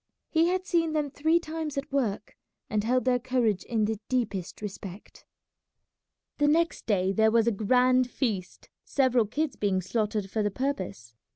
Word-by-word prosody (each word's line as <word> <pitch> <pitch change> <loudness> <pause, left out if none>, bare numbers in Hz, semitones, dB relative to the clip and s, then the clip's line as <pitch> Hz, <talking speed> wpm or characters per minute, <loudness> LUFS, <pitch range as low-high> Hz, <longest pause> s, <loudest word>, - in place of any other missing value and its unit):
He 325 +1 +4
had 370 +1 0
seen 330 -3 +1
them 300 -2 -1
three 315 +4 +2
times 315 -3 -5
at 275 - -4
work, 220 -7 -1 0.4
and 210 -1 +1
held 250 +3 +1
their 250 -1 +3
courage 240 -6 0
in 220 -3 0
the 220 -1 -2
deepest 205 -8 -2
respect. 200 -1 -9 1.1
The 290 - +4
next 330 +3 +1
day 190 -3 +2
there 220 +1 +4
was 225 0 +3
a 235 - +3
grand 250 +4 +3
feast, 215 -9 -3
several 255 -5 +2
kids 290 +5 -2
being 195 -2 0
slaughtered 210 +1 -2
for 220 - 0
the 205 - +1
purpose. 190 - -4
240 Hz, 165 wpm, -28 LUFS, 205-280 Hz, 1.1 s, He